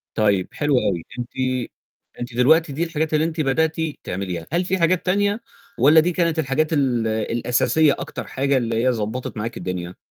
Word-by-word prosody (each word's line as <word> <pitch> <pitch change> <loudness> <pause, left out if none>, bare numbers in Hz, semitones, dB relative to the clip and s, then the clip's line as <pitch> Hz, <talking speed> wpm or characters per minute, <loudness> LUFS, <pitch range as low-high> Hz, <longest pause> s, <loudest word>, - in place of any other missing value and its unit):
طيب 100 -4 +2
حلو 145 -1 0
أوي 85 -4 -1 0.2
أنتِ، 120 0 -4 0.9
أنتِ 120 0 -5
دلوقتي 145 +5 +4
دي 160 - -1
الحاجات 160 -2 -2
اللي 155 +1 +3
أنتِ 165 -1 -2
بدأتِ 155 +3 +1 0.3
تعمليها، 90 -3 -4
هل 175 +2 +1
في 190 - 0
حاجات 170 +1 +2
تانية، 205 +4 +1 0.4
والّا 150 +6 +7
دي 170 +3 +2
كانت 170 -2 0
الحاجات 155 +2 0
ال 125 -6 +1
الأساسية 120 +7 +2
أكتر - - -6
حاجة 135 0 +1
اللي 115 -1 0
هي 130 - +4
ضبطّت 115 0 -3
معاكِ 115 +3 -4
الدنيا؟ 90 -1 -5
135 Hz, 170 wpm, -22 LUFS, 115-160 Hz, 0.9 s, والّا